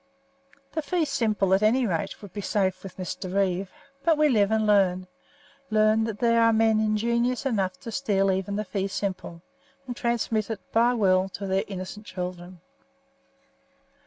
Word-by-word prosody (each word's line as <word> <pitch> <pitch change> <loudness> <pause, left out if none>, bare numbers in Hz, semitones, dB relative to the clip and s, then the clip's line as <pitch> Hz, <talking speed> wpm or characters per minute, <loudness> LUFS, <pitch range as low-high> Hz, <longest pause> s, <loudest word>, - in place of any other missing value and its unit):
The 315 - -2
fee 340 +1 0
simple, 215 -8 +1
at 190 - +3
any 240 +4 +3
rate, 175 0 -3
would 200 - -11
be 205 - -4
safe 190 -2 0
with 195 -2 -10
Mr. 185 0 -5
Reeve; 190 -1 0 0.3
but 325 -2 +3
we 305 0 +4
live 210 -6 +3
and 220 0 +1
learn 190 -3 +3 0.6
learn 215 0 +3
that 220 -2 -4
there 230 +1 +3
are 230 0 +5
men 220 -1 +3
ingenious 235 +4 0
enough 195 -7 -1
to 230 - -7
steal 195 -6 +1
even 190 +1 -2
the 210 +1 -2
fee 195 0 -2
simple, 185 -4 -4 0.4
and 245 -2 -5
transmit 230 -3 -1
it 220 -3 -3
by 235 +2 +3
will 190 -3 +2
to 200 +1 -7
their 190 0 0
innocent 195 +2 -7
children. 180 -1 -6
210 Hz, 165 wpm, -26 LUFS, 190-230 Hz, 0.6 s, are